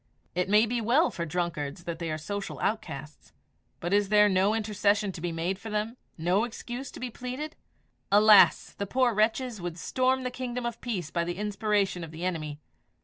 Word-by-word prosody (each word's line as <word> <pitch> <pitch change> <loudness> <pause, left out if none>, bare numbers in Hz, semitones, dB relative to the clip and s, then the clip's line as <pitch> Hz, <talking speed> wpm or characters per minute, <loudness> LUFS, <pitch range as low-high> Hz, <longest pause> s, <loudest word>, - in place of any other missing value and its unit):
It 180 +2 -1
may 210 +2 +6
be 235 +1 -1
well 250 +9 +3
for 170 -1 -4
drunkards 170 -1 -3
that 170 -1 -5
they 170 -1 -3
are 155 - -2
social 200 +6 -5
outcasts, 155 -9 -4 0.5
but 175 +3 -2
is 205 -1 +3
there 210 0 +6
no 195 +2 +3
intercession 210 -1 +1
to 175 - -9
be 175 0 -2
made 170 +4 -2
for 225 - -7
them 215 +2 -2 0.2
no 180 +6 +2
excuse 245 +2 -5
to - - -10
be 250 -1 -4
pleaded? 255 +7 -5 0.6
Alas! 210 0 +7
the 200 - -4
poor 250 +2 +2
wretches 220 +1 +1
would 175 -1 -4
storm 260 +7 +1
the 250 - -2
kingdom 250 -1 -4
of 235 -1 -4
peace 190 -10 -3
by 170 - 0
the 175 +1 -4
inspiration 205 -3 0
of 165 - -7
the 160 +3 -6
enemy. 155 -5 -3
205 Hz, 195 wpm, -28 LUFS, 175-230 Hz, 0.6 s, Alas